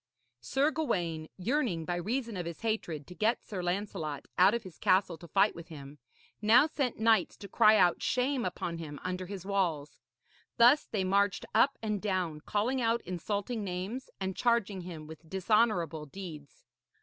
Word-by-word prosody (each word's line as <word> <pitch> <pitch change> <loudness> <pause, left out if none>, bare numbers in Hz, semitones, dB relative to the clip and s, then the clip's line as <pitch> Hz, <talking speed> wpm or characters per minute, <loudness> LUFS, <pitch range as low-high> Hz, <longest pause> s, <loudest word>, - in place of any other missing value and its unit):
Sir 270 - +1
Gawaine, 170 - -2
yearning, 205 - 0
by 175 - -1
reason 230 +6 -2
of 175 -2 -4
his 170 - -7
hatred, 175 -10 -2
to 180 - -11
get 220 +6 0
Sir 195 -4 -5
Lancelot 175 -5 -3
out 190 +5 +5
of 235 - -3
his 185 -5 -12
castle 185 -2 +3
to 170 - -11
fight 195 +6 +3
with 170 0 -10
him, 145 -3 -11 0.4
now 225 +6 +6
sent 280 -6 -2
knights 220 -3 +2
to 200 - -9
cry 215 +2 +5
out 180 -3 +3
shame 255 +1 0
upon 170 -2 -3
him 150 -3 -7
under 185 0 -3
his 190 -2 -7
walls. 175 -7 -1 0.6
Thus 245 +6 +6
they 205 -4 -2
marched 200 +1 +1
up 270 +5 +4
and 210 -3 -1
down, 185 -7 -1
calling 235 - 0
out 230 0 +1
insulting 205 +5 -3
names 195 +7 -4
and 190 -1 -3
charging 220 -5 +1
him 170 -3 -8
with 160 +1 -12
dishonourable 190 -6 +1
deeds. 155 -4 -10
190 Hz, 170 wpm, -31 LUFS, 170-225 Hz, 0.6 s, now